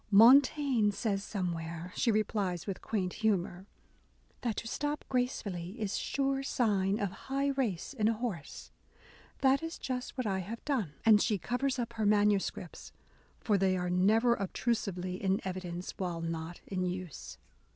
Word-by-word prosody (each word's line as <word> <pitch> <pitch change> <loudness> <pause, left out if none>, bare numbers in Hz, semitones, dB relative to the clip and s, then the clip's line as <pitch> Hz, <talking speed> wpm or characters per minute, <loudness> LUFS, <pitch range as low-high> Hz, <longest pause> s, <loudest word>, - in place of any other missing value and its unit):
Montaigne 255 +1 +6
says 200 -1 -1
some 185 -5 -2
where," 165 +2 -6
she 235 - +2
replies 205 -5 0
with 195 -3 -4
quaint 185 -5 -2
humour, 190 -3 0 0.7
"that 235 -3 -1
to 230 - -4
stop 295 +5 -2
gracefully 210 -6 -2
is 210 -3 -1
sure 275 -1 0
sign 205 -7 +1
of 200 -3 -1 0.2
high 275 +1 +1
race 255 -8 -1
in 220 -5 +1
a 225 - +3
horse. 215 -9 -5 0.7
That 270 +1 +4
is 325 +1 -5
just 255 0 -4
what 255 - -1
I 195 -2 0
have 220 +6 -6
done 230 - -1
!" - - -26
and 215 -2 +7
she 215 -4 +2
covers 255 +7 -1
up 235 -1 -3
her 220 -2 -1
manuscripts, 205 -4 +1 0.5
for 210 -4 +1
they 190 -1 +2
are 180 0 -1
never 215 +7 +4
obtrusively 195 -3 -2
in 190 0 +2
evidence 180 -1 -4
while 175 -3 -2
not 165 +1 -4
in 185 -2 -2
use. 180 -4 -5
205 Hz, 160 wpm, -32 LUFS, 185-245 Hz, 0.7 s, and